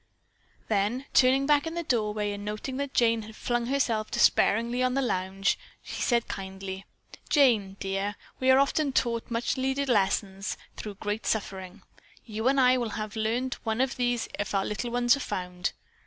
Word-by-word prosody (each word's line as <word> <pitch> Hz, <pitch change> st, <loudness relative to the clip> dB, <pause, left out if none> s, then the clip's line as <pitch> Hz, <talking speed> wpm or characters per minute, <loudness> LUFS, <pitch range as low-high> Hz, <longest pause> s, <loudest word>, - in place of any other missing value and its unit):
Then 215 Hz, +5 st, 0 dB
turning 265 Hz, +1 st, +5 dB
back 295 Hz, +1 st, +3 dB
in 325 Hz, -, -4 dB
the 340 Hz, -, -2 dB
doorway 210 Hz, -6 st, 0 dB
and 205 Hz, 0 st, -6 dB
noting 215 Hz, +5 st, -4 dB
that 280 Hz, -1 st, -4 dB
Jane 230 Hz, -1 st, +3 dB
had 220 Hz, 0 st, -11 dB
flung 240 Hz, 0 st, -1 dB
herself 235 Hz, -5 st, 0 dB
despairingly 235 Hz, +4 st, +3 dB
on 255 Hz, 0 st, +1 dB
the 275 Hz, -, +2 dB
lounge, 190 Hz, -3 st, 0 dB, 0.2 s
he -, -, -7 dB
said 235 Hz, -2 st, +2 dB
kindly: 190 Hz, 0 st, -6 dB, 0.4 s
"Jane, 220 Hz, -9 st, +3 dB
dear, 195 Hz, +1 st, -2 dB, 0.2 s
we 260 Hz, -, +2 dB
often 275 Hz, +3 st, +4 dB
are -, -, -1 dB
taught 235 Hz, -2 st, 0 dB
much 235 Hz, +3 st, -1 dB
needed 265 Hz, +1 st, 0 dB
lessons 195 Hz, -2 st, 0 dB, 0.2 s
through 210 Hz, -2 st, -7 dB
great 210 Hz, +2 st, -3 dB
suffering. 190 Hz, -2 st, -3 dB, 0.4 s
You 220 Hz, +1 st, -2 dB
and 275 Hz, +1 st, +4 dB
I 255 Hz, 0 st, +5 dB
will 240 Hz, -, -1 dB
each 215 Hz, -, -7 dB
have 215 Hz, 0 st, -4 dB
learned 235 Hz, +4 st, -1 dB
one 220 Hz, 0 st, -1 dB
of 265 Hz, 0 st, +1 dB
these 245 Hz, -2 st, 0 dB
if 205 Hz, 0 st, -2 dB
our 195 Hz, -, +1 dB
little 210 Hz, +3 st, -3 dB
ones 240 Hz, +1 st, +3 dB
are -, -, -6 dB
found." 180 Hz, -7 st, -3 dB
230 Hz, 180 wpm, -28 LUFS, 205-255 Hz, 0.4 s, turning